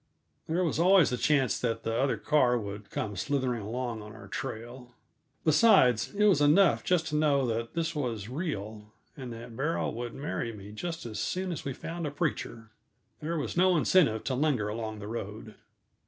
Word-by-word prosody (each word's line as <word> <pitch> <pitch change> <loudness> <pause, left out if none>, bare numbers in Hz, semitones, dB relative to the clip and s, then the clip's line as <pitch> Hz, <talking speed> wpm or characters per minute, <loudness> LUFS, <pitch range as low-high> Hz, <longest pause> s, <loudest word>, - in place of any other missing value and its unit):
There 170 +3 +1
was 160 -3 0
always 180 -3 +5
the - - +1
chance 140 -1 +2
that 115 -2 -2
the 115 - -1
other 130 -2 +1
car 130 -5 +3
would 100 -2 -6
come 105 -2 -3
slithering 130 +1 -1
along 115 +1 -4
on 105 +1 -10
our 110 - -11
trail. 120 0 -7 0.5
Besides, 155 - +5
it 210 - +2
was 195 -8 +5
enough 165 +6 +5
just 175 -3 +2
to 150 - -2
know 145 -3 +3
that 115 +2 -3
this 165 -1 -1
was 120 -9 -3
real, 110 - -5 0.2
and 130 -3 -7
that 115 0 -9
Beryl 150 +7 -1
would 120 0 -5
marry 135 -4 -3
me 100 -1 -10
just 165 +9 -5
as 110 -2 -5
soon 185 0 -2
as 165 - -5
we 135 - -2
found 165 +4 -5
a - - -1
preacher. 140 -7 -3 0.5
There 165 +2 -2
was 150 - -3
no 180 0 +4
incentive 150 - +3
to 135 - -2
linger 130 -6 +1
along 110 0 -4
the 105 0 -7
road. 110 -1 -6
130 Hz, 185 wpm, -29 LUFS, 115-155 Hz, 0.5 s, always